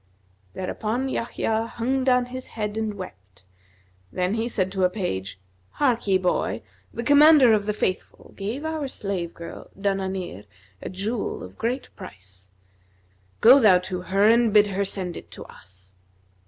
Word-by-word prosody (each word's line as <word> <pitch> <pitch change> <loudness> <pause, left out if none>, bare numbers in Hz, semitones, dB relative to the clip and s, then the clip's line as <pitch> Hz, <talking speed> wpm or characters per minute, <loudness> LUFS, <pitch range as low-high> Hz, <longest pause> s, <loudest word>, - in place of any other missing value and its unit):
Thereupon 220 +7 -2
Yahya 225 -2 -1
hung 260 +3 0
down 250 -1 +3
his 255 +1 -8
head 210 -2 -4
and 220 -1 -2
wept; 100 - -11 0.7
then 180 +2 -1
he 225 +1 -1
said 190 -6 -1
to 190 -1 -1
a 180 - +4
page, 95 - -4 0.4
'Harkye, 230 -9 +2
boy, 180 -1 -1 0.3
the 235 - -5
Commander 285 -2 +7
of 205 -1 +1
the 210 - +1
Faithful 185 -3 -4
gave 225 +10 -4
our 315 -3 -2
slave 195 -8 -4
girl 170 0 -9
Danбnнr 190 - -3 0.4
a - - -5
jewel 205 +4 -3
of 90 +1 -11
great 250 +3 -3
price: 95 -1 -11 0.9
go 255 +5 +9
thou 205 -7 +6
to 180 0 -4
her 195 +2 0
and 230 +1 +5
bid 210 0 +6
her 200 +1 0
send 185 -3 -3
it - - -10
to - - -9
us.' 95 0 -17
205 Hz, 155 wpm, -24 LUFS, 180-235 Hz, 0.9 s, go